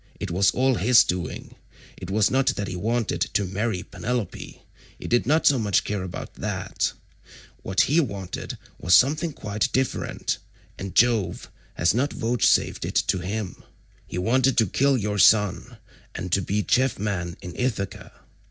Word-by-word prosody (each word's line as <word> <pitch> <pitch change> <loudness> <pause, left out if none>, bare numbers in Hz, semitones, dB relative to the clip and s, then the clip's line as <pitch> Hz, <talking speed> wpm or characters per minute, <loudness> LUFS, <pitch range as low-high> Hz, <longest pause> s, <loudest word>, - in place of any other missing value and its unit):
It - - -4
was 95 +3 +3
all 130 +1 +2
his 115 +2 +5
doing. 90 -3 -4 0.4
It - - -9
was 105 +1 +2
not 135 0 +2
that 100 - -3
he 90 - -5
wanted 110 -2 -1
to 100 +2 0
marry 100 0 -2
Penelope; 125 -4 -5 0.3
he - - -8
did 120 0 +1
not 155 +3 +2
so 135 -3 +5
much 105 -4 +1
care 105 -2 -3
about 90 -1 -7
that; - - -3 0.7
what 95 -1 +1
he 150 +5 +3
wanted 100 - -4 0.2
was 90 - +4
something 155 - +3
quite 105 -5 -2
different, 130 -1 -1 0.4
and 95 -1 -6
Jove 110 -7 +2 0.2
has 85 +3 +2
not 130 +6 0
vouchsafed 120 +2 +1
it - - -5
to 95 - +2
him; 100 +1 -5 0.5
he - - -6
wanted 125 +7 +2
to 110 - +5
kill 135 +7 +2
your 105 -2 -2
son 105 +4 +3 0.4
and 90 - -5
to 95 - +2
be 105 +3 -1
chief 130 +2 +2
man 90 -5 -3
in 90 -1 -9
Ithaca. 105 -5 -3
105 Hz, 160 wpm, -24 LUFS, 95-125 Hz, 0.7 s, his